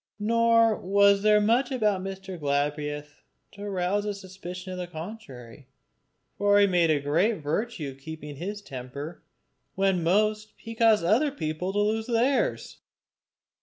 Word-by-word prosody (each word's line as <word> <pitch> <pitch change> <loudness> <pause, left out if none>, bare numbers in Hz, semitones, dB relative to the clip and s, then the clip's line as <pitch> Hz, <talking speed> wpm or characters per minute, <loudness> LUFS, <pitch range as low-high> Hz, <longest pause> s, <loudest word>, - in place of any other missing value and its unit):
Nor 230 +1 +3
was 200 +1 +4
there 210 0 +5
much 230 +6 +2
about 210 -7 +1
Mr. 190 -1 -7
Galbraith 145 +1 -2 0.3
to 205 0 -7
rouse 190 +2 0
a 205 -1 -3
suspicion 185 -1 -8
of 180 - -6
the 180 - -4
contrary; 155 - -10 0.7
for 205 0 +4
he 205 - +6
made 175 -4 +2
a 155 -2 +3
great 165 +11 +1
virtue 165 +2 -2
of 135 - -16
keeping 150 -2 -8
his 205 +6 -5
temper 140 +4 -8 0.5
when 190 -2 +1
most 215 +5 +1
he 230 - -9
caused 225 -4 +4
other 230 - +3
people 180 - -3
to 205 - 0
lose 220 +2 0
theirs. 255 - 0
195 Hz, 145 wpm, -26 LUFS, 160-215 Hz, 0.7 s, he